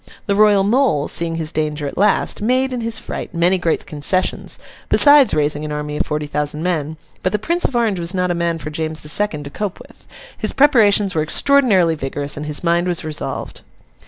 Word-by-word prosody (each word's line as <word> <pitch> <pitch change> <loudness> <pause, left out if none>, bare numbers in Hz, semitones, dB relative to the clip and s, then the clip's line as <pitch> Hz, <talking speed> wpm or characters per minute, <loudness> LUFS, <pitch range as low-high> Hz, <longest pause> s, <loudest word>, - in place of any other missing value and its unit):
The 200 - 0
Royal 205 -1 +4
Mole, 210 - +1
seeing 165 -1 0
his 160 -1 -3
danger 150 -1 -2
at 140 - -5
last, 205 +1 +1
made, 255 +4 +1
in 245 - -3
his 230 0 -1
fright, - - -6
many 175 +3 +2
great 170 -2 -1
concessions, 155 +5 -1 0.3
besides 285 - +6
raising 150 0 0
an 150 - -5
army 150 0 -4
of - - -2
forty 150 0 -2
thousand 150 +1 -2
men; 160 -3 -2 0.2
but 185 - -1
the - - +2
Prince 340 - 0
of 265 - -1
Orange 225 -6 +1
was 170 0 -2
not 180 -1 0
a - - +1
man 170 -1 -1
for 155 -1 -7
James 155 0 -4
the 150 - -7
Second 165 -4 0
to 140 - -9
cope 205 +1 -4
with. - - -17 0.3
His - - -3
preparations 215 -8 +4
were 155 - 0
extraordinarily 195 - +3
vigorous, 140 -1 -4
and 150 +1 -6
his 150 +2 -3
mind 170 +1 +1
was 175 -2 -1
resolved. 155 -1 -5
170 Hz, 210 wpm, -18 LUFS, 150-210 Hz, 0.3 s, besides